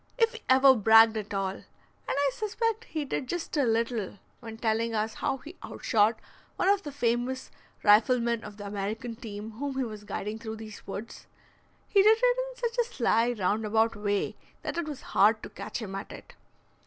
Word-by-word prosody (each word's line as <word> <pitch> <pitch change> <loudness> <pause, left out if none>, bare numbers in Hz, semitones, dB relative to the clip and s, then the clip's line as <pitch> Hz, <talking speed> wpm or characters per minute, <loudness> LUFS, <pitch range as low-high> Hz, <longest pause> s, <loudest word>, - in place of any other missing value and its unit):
If 455 -1 +3
he - - -9
ever 265 +1 +7
bragged 225 0 +6
at 210 -1 -5
all 195 -1 -1
(and - - -15 0.4
I 280 0 +1
suspect 450 +1 -2
he 310 -2 -4
did 265 -1 -3
just 345 +3 -4
a 285 -3 +3
little, 225 -3 -1 0.2
when 225 -2 -9
telling 225 0 0
us 215 +1 -1
how 270 - -1
he 315 +6 -12
outshot 220 0 +1 0.4
one - - 0
of 400 -1 +3
the 295 - -7
famous 245 -1 -1 0.3
riflemen 235 +2 +4
of 210 -1 -9
the 205 - -8
American 210 +4 -4
team, 220 -2 -7
whom 280 -1 -3
he 265 - +1
was 215 -3 -7
guiding 210 +1 -4
through 220 -1 -6
these 215 -1 -10
woods), 200 +3 -7 0.6
he 400 - +5
did 435 +2 +6
it - - +4
in - - -4
such 475 -1 -3
a 480 0 +1
sly, 235 0 +2
round 210 0 0
about 220 +1 +2
way 205 -1 -1 0.3
that - - -3
it 335 - -3
was 290 -3 -6
hard 215 +2 +3
to - - -6
catch 215 +2 -6
him 195 -2 -6
at 195 +1 -6
it. - - -11
230 Hz, 195 wpm, -28 LUFS, 215-285 Hz, 0.6 s, ever